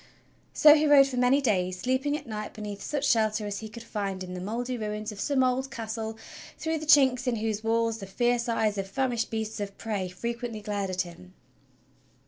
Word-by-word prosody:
So 300 -1 +8
he 305 0 +3
rode 285 -2 +8
for 265 -2 -4
many 250 +3 +4
days, 185 -7 0
sleeping 260 +6 0
at - - -11
night 215 -2 -6
beneath 205 -2 -6
such 290 -1 -2
shelter 215 -2 +2
as 205 -1 -4
he 220 - -7
could 230 +1 -10
find 200 -4 -4
in 180 0 -7
the 180 - -5
mouldy 240 +6 -3
ruins 215 -1 -4
of 205 - -10
some 275 +1 +2
old 255 +1 0
castle 220 -2 -5 0.4
through 320 0 -2
the 310 - -7
chinks 260 -4 +5
in 245 - +2
whose 220 -1 -2
walls 225 0 +1
the 195 - -7
fierce 240 +4 0
eyes 215 -3 +1
of 195 - -3
famished 245 -1 -1
beasts 220 -1 -3
of 200 -1 -5
prey 205 -5 -3
fre 180 +6 -4
quently 235 -3 -5
glared 205 -2 -2
at 185 -1 0
him. 170 - -10
225 Hz, 210 wpm, -28 LUFS, 205-250 Hz, 0.4 s, So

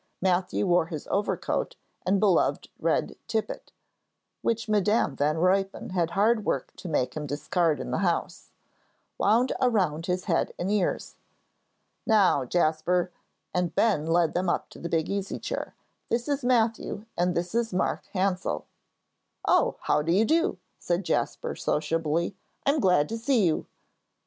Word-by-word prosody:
Matthew 185 +1 +1
wore 175 -3 +3
his 155 -3 -6
overcoat 205 +1 -1 0.3
and 195 +1 +3
beloved 200 -3 +2
red - - 0
tippet 225 -2 -3 0.7
(which 230 0 -1
Madam 210 -7 +2
Van 150 +2 +1
Ruypen 195 +3 +1
had 175 -3 +1
hard 215 +2 +3
work - - -2
to 180 - -7
make 130 -5 0
him 150 -1 -4
discard 150 +3 0
in - - -5
the - - 0
house) 175 -4 -1 0.7
wound 230 +5 +3
around 185 - +1
his 180 0 -1
head - - 0
and 185 +3 -2
ears. 205 -4 -1 0.9
"Now, 200 - +4
Jasper," 175 +4 +1 0.4
and 180 -1 -1
Ben 190 -9 +2
led 165 -1 +2
them 180 0 0
up - - -1
to - - -13
the 170 - -5
big 160 -1 +1
easy 200 -1 -3
chair, - - -5 0.3
"this 235 +1 0
is 285 -2 -1
Matthew 225 -3 +1
and 175 0 +1
this 175 +2 -2
is 235 -1 0
Mark 185 - -1
Hansell." 185 - 0 0.8
"Oh, - - +3
how 150 - +2
do 165 +3 -1
you 200 +6 +4
do?" 335 - +2 0.2
said 175 +2 -1
Jasper, - - -1
sociably. 165 +3 -1 0.3
"I'm 285 +2 +3
glad 180 - +3
to 225 +1 -3
see 235 -3 +2
you." 160 -3 0
185 Hz, 150 wpm, -27 LUFS, 165-215 Hz, 0.9 s, Now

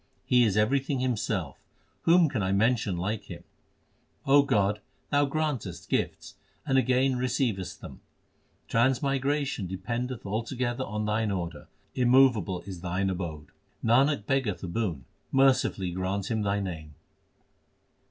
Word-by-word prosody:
He 125 -1 +4
is 105 -2 +1
everything 135 +5 +1
Himself; 105 - -2 0.5
whom 170 0 +6
can 130 -7 -2
I 95 0 0
mention 105 -2 +1
like 100 +4 -3
Him? - - -9 0.8
God, 110 -8 +3 0.3
Thou 145 0 +4
grantest 135 - -3
gifts, - - -2 0.3
and 135 - +1
again 130 +1 +2
receivest 125 -7 -1
them. - - -10 0.7
Transmigration 135 -1 +1
dependeth 120 +7 -4
altogether 120 +4 -2
on 105 -2 -3
Thine 105 +1 0
order; 85 -5 -4 0.3
immovable 120 -8 +3
is 95 -3 -9
Thine 95 +2 -1
abode. 80 -5 -5 0.4
Nanak 130 +1 +3
beggeth 115 -10 -1
a - - -3
boon; 85 - -3 0.3
mercifully 130 -9 +2
grant 95 +3 -2
him 110 -1 0
Thy 100 0 0
name. 80 -6 -6
110 Hz, 125 wpm, -28 LUFS, 95-130 Hz, 0.8 s, whom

